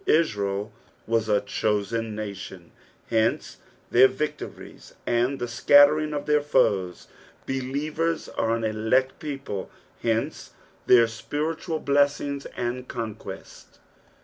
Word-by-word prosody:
Israel 105 -10 +1 0.3
was 115 -1 0
a 105 -1 +3
chosen 110 +1 -1
nation, 95 -4 -7 0.4
hence 110 -1 +1 0.3
their 130 +2 +7
victories 140 +4 -6
and 120 +3 +1
the 120 - -3
scuttering 145 +5 +5
of 145 -1 -3
their 150 0 +3
foes; 95 -10 +1 0.4
believers 150 +5 -2
are 115 0 0
an 115 - -3
elect 110 +5 +1
people, 135 -10 -5 0.3
hence 115 -1 -2 0.3
their 120 -2 +7
spiritual 155 +8 -3
blessings 140 -1 +1
and 125 +1 -3
conquests. 115 -2 -8
120 Hz, 105 wpm, -25 LUFS, 110-145 Hz, 0.4 s, their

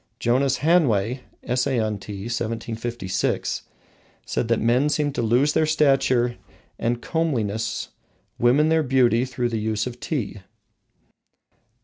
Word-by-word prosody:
Jonas 130 +3 +2
Hanway 125 - +3 0.2
(Essay 125 +1 0
on 110 -2 -1
Tea, 100 -1 -7
1756) 115 -2 -2 0.6
said 115 - -1
that 115 -1 +2
men 125 +6 +2
seemed 150 -1 0
to 135 - -1
lose 125 +6 +3
their 155 - +2
stature 135 -5 +2 0.4
and 120 +1 -1
comeliness, 115 - -1 0.5
women 135 +6 +4
their 160 0 +3
beauty 125 -3 +3
through 125 -1 -2
the 115 -2 -2
use 110 0 -1
of 125 -1 -6
tea. 120 -9 -3
120 Hz, 120 wpm, -23 LUFS, 115-140 Hz, 0.6 s, women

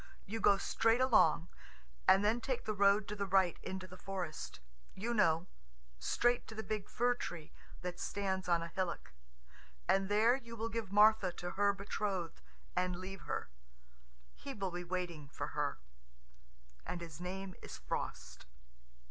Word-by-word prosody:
You 225 +3 -4
go 200 -2 +5
straight 225 +4 +2
along, 255 -9 +5 0.6
and 195 +2 +6
then 225 +3 +2
take 255 0 -2
the 215 - 0
road 200 +1 +4
to 210 - -4
the 200 -1 -2
right 190 -2 +3
into 190 0 -5
the 185 0 -12
forest... 185 -5 -5 0.4
you 230 +5 -2
know... 165 -6 +3 0.5
straight 240 - +2
to 220 - -8
the 220 - -4
big 215 -3 -3
fir 245 +2 +2
tree 175 -9 -6 0.3
that 180 0 -4
stands 190 -2 -2
on 170 -1 +3
a - - -4
hillock, 170 - -3 0.7
and 195 0 +3
there 220 +4 +5
you 235 -3 -8
will 225 0 -2
give 225 -4 -3
Martha 210 -2 +6
to 175 0 -5
her 205 0 +3
betrothed 200 -3 -3 0.3
and 180 0 +1
leave 185 +1 -7
her. - - -2 0.8
He 275 - -7
will 195 -3 -2
be 175 0 -4
waiting 175 -5 -4
for - - -4
her, - - -1 1.1
and 180 - -4
his 165 -1 -8
name 190 +1 -4
is - - -8
Frost." 65 -1 -5
195 Hz, 160 wpm, -35 LUFS, 180-215 Hz, 1.1 s, and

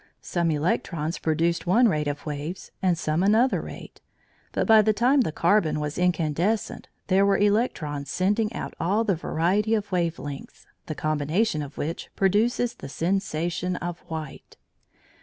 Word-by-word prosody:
Some 170 -2 0
electrons 160 +1 -1
produced 165 +2 0
one 235 +7 +5
rate 150 -7 0
of 145 0 -4
waves, 150 +4 -5
and 180 -3 +2
some 155 +1 0
another 220 +6 +3
rate, - - -10 0.5
but - - 0
by 220 -1 +7
the 215 +1 +2
time 255 +6 +3
the 220 - 0
carbon 170 -1 +2
was 150 +2 -3
incandescent 180 +4 0 0.2
there 195 +1 +3
were 200 0 +3
electrons 180 - 0
sending 210 +6 +1
out - - -5
all 200 +7 +1
the 210 -3 +1
variety 185 +6 +1
of 205 -2 -3
wave 170 -2 0
lengths, 140 0 -8 0.2
the 155 - -4
combination 155 +5 0
of 145 -1 -8
which 165 +3 -4
produces 225 +5 +2
the 135 - -10
sensation 175 +1 -1
of 175 -1 -5
white. 160 -3 -7
175 Hz, 155 wpm, -25 LUFS, 155-205 Hz, 0.5 s, by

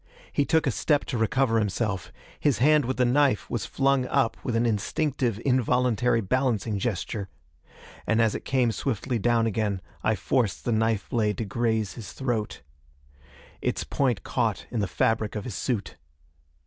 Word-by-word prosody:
He 145 - +2
took 160 +1 +2
a 135 - +2
step 145 +5 +1
to 125 - -3
recover 115 +1 +2
himself; 105 -2 -2 0.3
his 145 -4 +2
hand 150 +1 +4
with 130 +2 -2
the 125 - +3
knife 130 -1 +2
was 105 -6 -2
flung 135 -2 +1
up 115 - +1
with 120 - -2
an 115 +1 +2
instinctive, 120 +1 0
involuntary 125 -2 +2
balancing 115 -2 0
gesture. 100 -2 -3 0.8
And 110 - +2
as 115 -2 +3
it - - -5
came 125 -3 +2
swiftly 120 0 -2
down 115 +1 +2
again, 105 -3 0 0.2
I 110 - +2
forced 110 +2 0
the 120 - +1
knife 110 -1 +1
blade 105 -6 0
to 115 - -2
graze 110 -1 0
his 115 -5 -9
throat. 115 - -3 1.0
Its - - -1
point 130 -7 0
caught - - -1
in 115 - -1
the 100 - 0
fabric 110 +4 0
of 105 - -3
his 120 - -6
suit. 115 0 -3
115 Hz, 165 wpm, -26 LUFS, 105-130 Hz, 1.0 s, hand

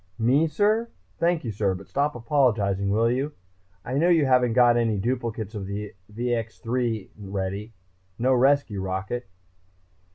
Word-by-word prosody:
Me, 130 +8 +3
sir? 215 +8 +1 0.3
Thank 170 -1 +1
you, 115 - -3
sir. 100 -2 0
But 95 +1 -10
stop 145 +1 0
apologizing, 115 -6 +1
will 115 +3 +2
you? 135 +4 -1 0.5
I 130 +3 -1
know 170 +3 +3
you 165 -4 +4
haven't 125 -3 +3
got 120 -1 +5
any 115 -3 +1
duplicates 115 -1 -2
of 100 -3 -5
the 100 +1 -5 0.2
VX 115 0 -2
3 115 -4 -2
ready, 100 +2 -4 0.4
no 130 +3 +2
rescue 130 -5 +2
rocket...." 95 +4 -4
120 Hz, 150 wpm, -25 LUFS, 105-130 Hz, 0.5 s, got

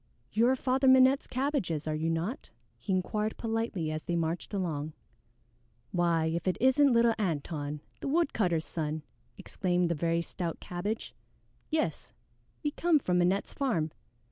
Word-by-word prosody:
"You 230 +3 +3
are 260 - +4
Father 265 +1 +1
Minette's 260 +1 +6
cabbages, 250 - -1
are 155 - 0
you 155 +2 -1
not?" 170 - -2 0.3
he 125 - -4
inquired 210 +4 0
politely 225 -8 -2
as 155 0 -4
they 175 - -1
marched 165 +1 -2
along. 160 -6 -2 1.0
"Why, 170 -2 +2
if 165 +3 -2
it 185 - +1
isn't 265 +3 +5
little 235 -1 +5
Antone, 150 -5 -2 0.2
the - - -4
woodcutter's 220 - +1
son!" 155 -1 -3 0.3
exclaimed 180 -1 0
the - - +2
very 170 +1 0
stout 170 -1 -4
Cabbage. 200 +5 -4 0.6
"Yes, 305 - -1 0.5
we 295 - 0
come 335 +1 +3
from 180 -10 +1
Minette's 185 +3 +1
farm. 175 - 0
180 Hz, 145 wpm, -30 LUFS, 165-245 Hz, 1.0 s, Minette's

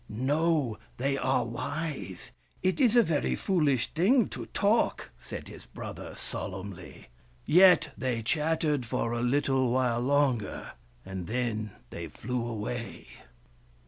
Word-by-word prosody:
" - - -31
No, 140 0 +1 0.2
they 135 +2 0
are 135 -2 +1
wise. 120 - -4 0.3
It 185 +8 +1
is 245 -3 +5
a 240 - +7
very 160 -7 0
foolish 150 - +1
thing 210 - +4
to - - -7
talk," 210 +3 +1
said - - -7
his - - -11
brother - - -8
solemnly. 95 -4 -6 0.4
Yet 175 -1 +6
they 120 -3 -2
chat 155 +7 +1
tered 150 -5 +1
for 115 0 -1
a 120 - -1
little 130 0 +2
while 125 -1 +2
longer, 130 -5 +1 0.3
and 95 -2 -5
then 110 -3 -2 0.2
they - - -5
flew 125 0 -3
away. 115 +1 -5
130 Hz, 135 wpm, -29 LUFS, 115-155 Hz, 0.4 s, a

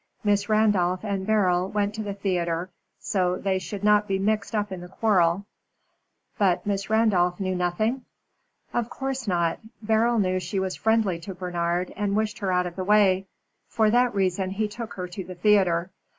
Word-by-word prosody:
Miss 205 0 +1
Randolph 205 -4 +2
and 195 -2 -2
Beryl 185 -4 +2
went 205 0 -1
to 220 - -4
the 205 -2 -4
theatre 180 -3 -2 0.3
so 180 -3 0
that - - -9
they 190 -1 +1
should 195 +3 -7
not 210 0 +4
be 195 - 0
mixed 210 +2 -1
up 210 -1 -1
in 185 -2 -5
the 180 - -8
quarrel." 190 -2 +2 0.9
"But 190 -4 +2
Miss 200 -1 -2
Randolph 200 -5 +2
knew 185 -1 -1
nothing?" 185 +8 -1 0.7
"Of 240 -1 -1
course 265 -3 -4
not. 170 -3 0 0.2
Beryl 225 +2 +2
knew 185 -3 +1
she 185 +2 -3
was 190 -1 -2
friendly 220 -6 +1
to 185 +3 -8
Bernard, 175 0 -2
and 205 -1 -1
wished 215 0 -1
her 195 -2 -1
out 180 0 +2
of 175 0 -7
the 185 - -2
way. 195 -1 +3 0.4
For 220 -2 +2
that 245 -1 +3
reason, 190 -1 0
he 210 +3 -1
took 225 +2 -7
her 180 -1 -4
to 180 +2 -6
the 185 0 -9
theatre. 180 -2 +2
195 Hz, 185 wpm, -25 LUFS, 180-210 Hz, 0.9 s, not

